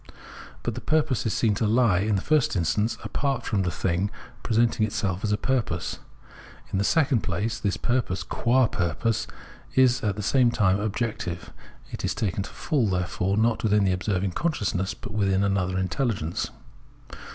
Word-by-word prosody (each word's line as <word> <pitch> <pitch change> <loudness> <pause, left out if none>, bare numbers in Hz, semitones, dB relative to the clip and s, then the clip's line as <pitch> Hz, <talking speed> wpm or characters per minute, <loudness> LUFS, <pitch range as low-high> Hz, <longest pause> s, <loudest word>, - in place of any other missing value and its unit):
But - - -1
the - - -6
purpose 155 -6 +1
is 110 - 0
seen 110 -3 +2
to 105 +2 0
he, 105 -4 +3
in 105 - +2
the 95 - -1
first 155 -7 +2
instance, 105 +6 +1
apart 135 -4 -1
from 100 -3 0
the 90 - 0
thiug 85 +4 -1 0.3
presenting 115 -1 +2
itself 100 -3 -1
as 105 - 0
a 105 - +2
purpose. 130 -1 -1 0.7
In 95 - +1
the - - +2
second 135 -3 +3
place, 105 +5 -2
this 100 -2 -1
purpose 110 -7 -1
qua 125 +7 +2
purpose 110 +4 -1 0.5
is 130 -1 +4
at 105 -3 0
the 105 - -4
same 125 +2 +4
time 100 -4 +2
objective; 105 -4 -3 0.4
it - - -6
is - - -1
taken 100 -2 -1
to - - -6
fall, 140 -9 0
therefore, 90 +1 0
not 115 0 +2
withm 105 -2 +2
the 95 - +3
observing 95 0 -1
consciousness, 100 - -1
but - - -9
within 100 -2 +2
another 95 -2 0
intelhgence. 95 - -1
105 Hz, 170 wpm, -26 LUFS, 95-120 Hz, 0.7 s, is